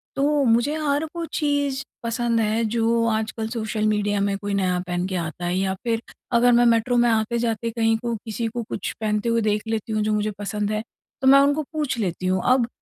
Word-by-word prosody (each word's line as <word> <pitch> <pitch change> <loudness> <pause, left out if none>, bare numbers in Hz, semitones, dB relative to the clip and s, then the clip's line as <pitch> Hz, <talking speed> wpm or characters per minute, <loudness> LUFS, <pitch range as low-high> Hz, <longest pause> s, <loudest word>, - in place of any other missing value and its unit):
तो 285 +1 +2
मुझे 240 +6 +3
हर 290 +2 +1
वो 335 -1 -3
चीज़ 285 -2 0 0.2
पसंद 230 0 0
है 220 +1 +1
जो 230 0 +2
आजकल 220 0 -2
सोशल 220 -2 -2
मीडिया 205 -1 +1
में 200 0 0
कोई 205 0 -4
नया 185 -2 +1
पहन 175 0 -1
के 190 - -4
आता 170 0 -4
है 175 +1 0
या 190 0 0
फिर 230 -1 0 0.3
अगर 245 +1 +5
मैं 240 0 +5
मेट्रो 235 +1 +3
में 240 0 +4
आते-जाते 230 +1 0
कहीं 225 -1 +2
को 235 0 -3
किसी 225 +1 -3
को 235 +1 -4
कुछ - - -3
पहनते 210 +1 0
हुए 230 0 +2
देख 210 -1 0
लेती 225 0 -2
हूँ 215 - +1
जो 215 0 0
मुझे 210 0 0
पसंद 205 +1 -2
है, 215 0 -1 0.4
तो 265 - +2
मैं 275 +1 +8
उनको 285 +2 +3
पूछ 295 -6 -1
लेती 185 -2 -2
हूँ। 185 0 +1
अब 250 -2 +3
225 Hz, 215 wpm, -23 LUFS, 210-240 Hz, 0.4 s, मैं